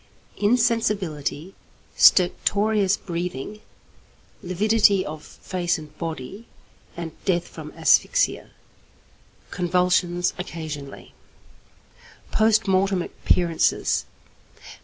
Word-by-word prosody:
Insensibility, 205 - 0 0.4
stertorous 200 +2 +3
breathing, 175 +2 -5 0.8
lividity 200 +1 +2
of 155 0 -7
face 180 -2 -3
and 155 -1 -12
body, 165 - -6 0.5
and 170 -1 -5
death 175 -3 0
from - - -10
asphyxia. - - +2 1.0
Convulsions 180 -1 +1
occasionally. 155 -6 -7 1.2
_Post 220 0 +3
Mortem 190 -1 +2
Appearances. 170 -2 0
180 Hz, 70 wpm, -23 LUFS, 170-205 Hz, 1.2 s, stertorous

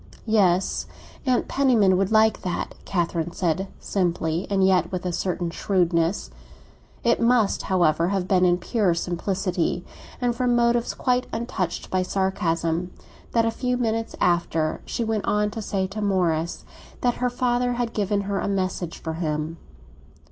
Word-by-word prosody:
"Yes, 195 -5 +2 0.4
Aunt 250 -1 +2
Penniman 235 -9 +3
would 195 +2 +1
like 220 -1 +4
that," 180 -2 -3
Catherine 170 -2 -1
said 185 +1 0
simply—and 180 +1 0
yet 180 -3 +3
with 185 -1 -3
a 180 - -1
certain 175 -1 -2
shrewdness. 170 -1 0 0.7
It 235 0 +2
must, 230 -3 +3
however, 170 -3 +2
have 190 -1 -1
been 185 -2 +3
in 175 -1 +4
pure 190 -2 +1
simplicity, 180 0 -1 0.3
and 245 -1 0
from 245 -1 +1
motives 235 0 +2
quite 250 -1 +1
untouched 225 -7 -3
by 185 - +2
sarcasm, 180 -2 -1 0.4
that, 230 -1 +3
a 225 - +1
few 250 +2 -1
moments 225 -2 -1
after, 165 -2 +1
she 235 - -2
went 220 -2 -1
on 210 0 +1
to 225 - -5
say 195 -2 -1
to 215 +2 -5
Morris 175 -5 0 0.4
that 245 -1 +1
her 250 - +2
father 245 0 0
had 240 -1 -2
given 205 -1 0
her 200 0 -2
a - - -2
message 185 -3 -2
for 160 - -5
him. 160 0 -2
190 Hz, 150 wpm, -24 LUFS, 175-225 Hz, 0.7 s, like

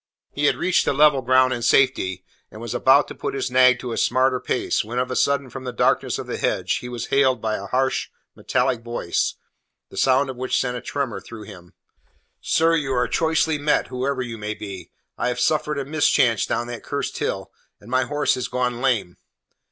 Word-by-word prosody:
He 145 - -1
had - - +3
reached 185 0 +1
the - - +1
level 145 -1 +4
ground 130 +1 +3
in 120 - -4
safety, 115 -7 +2 0.2
and 110 - -12
was 115 +1 -5
about 135 +1 +4
to - - -8
put - - -4
his 130 -1 -2
nag 125 -1 +5
to 125 -1 -6
a - - -3
smarter 130 +1 +2
pace, 125 - -1
when 115 +3 -6
of 125 0 -1
a - - -2
sudden 140 0 +1
from 130 +1 -7
the 125 - -4
darkness 120 - +1
of - - -6
the - - -4
hedge - - 0
he 125 - -7
was 120 -1 -5
hailed 135 -3 +3
by 110 -1 -1
a 100 - -7
harsh, 130 +3 0 0.3
metallic 125 -3 0
voice, 120 -7 -2 0.6
the - - -11
sound 135 +1 +3
of 130 - -11
which 130 +1 0
sent 125 -1 -1
a 125 - -5
tremor 130 -8 -3
through 115 -2 -10
him. 90 -3 -13 0.7
"Sir, 165 +1 +2
you 145 -4 -1
are 125 - +1
choicely 160 -1 +1
met, 150 +1 +1
whoever 130 +1 -2
you 115 -2 -7
may 105 0 -4
be. 100 -3 -8 0.3
I - - 0
have 125 0 -2
suffered 150 +1 +1
a 140 - -3
mischance 135 -6 +2
down 120 +1 -1
that 120 -1 -7
cursed - - -4
hill, - - -3 0.3
and 110 - -14
my 130 0 +2
horse 145 +2 +1
has 125 - -3
gone 125 -1 -2
lame." 115 -10 0
125 Hz, 215 wpm, -22 LUFS, 120-135 Hz, 0.7 s, nag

